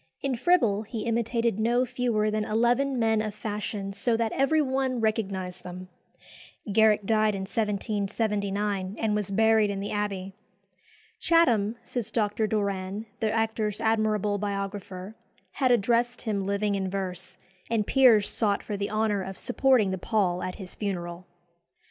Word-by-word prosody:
In 270 -2 -1
Fribble 235 - +3
he 220 +1 -6
imitated 230 -1 0
no 240 +3 +2
fewer 240 -4 0
than 215 0 0
eleven 240 +5 +1
men 225 -2 +2
of 215 -1 -4
fashion 210 -2 -4
so 230 +3 +1
that 225 -1 0
every 295 +4 +2
one 265 -3 0
recognised 190 -5 -2
them. 180 0 -9 0.8
Garrick 215 -1 +4
died 215 0 +2
in 195 - -4
1779, 205 -1 -1
and 220 -2 0
was 210 -2 -1
buried 220 +1 +3
in 200 -1 -3
the 200 - -4
Abbey. 195 -2 -3 0.9
"Chatham," 235 -11 +3
says 235 -4 -3
Dr. 215 -1 0
Doran, 200 -1 -2
the 220 -1 0
actor's 220 -2 -1
admirable 215 -2 +1
biographer, 200 -1 -4 0.4
"had 260 -3 +1
addressed 240 +2 +2
him 200 -4 -2
living 200 +1 0
in 190 -1 -1
verse, 185 -1 -5 0.3
and 225 -2 +1
peers 240 -6 +5
sought 205 -3 0
for 210 - -4
the 200 0 -2
honour 215 -2 0
of 190 0 -6
supporting 245 -5 +2
the 190 - -3
pall 185 -4 0
at 185 - -4
his 190 -3 -8
funeral." 180 -3 -4
210 Hz, 150 wpm, -27 LUFS, 195-230 Hz, 0.9 s, peers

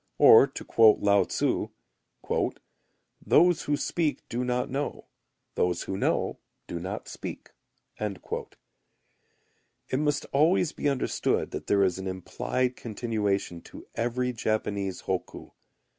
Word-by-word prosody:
Or - - +8
to - - -8
quote 110 -2 +6
Lao 100 0 +4
tzu: - - 0 1.6
"Those 175 -1 +4
who 145 0 0
speak 160 -1 -1
do 120 +2 -2
not 125 0 0
know, 140 +2 -4 0.5
those 90 -1 0
who 95 - -4
know - - 0 0.3
do 85 - -5
not 95 +4 -5
speak." - - -8 0.5
It 105 -3 -5 1.4
must 150 -1 0
always 160 +3 +3
be 145 - -1
understood 135 -2 0
that - - -6
there 100 -1 +4
is 95 -1 +1
an 95 - -5
implied 125 +7 -2
continuation 105 -6 -2
to - - -12
every 125 +2 -1
Japanese 100 -4 -2
hokku. - - -4
115 Hz, 120 wpm, -27 LUFS, 100-135 Hz, 1.6 s, Or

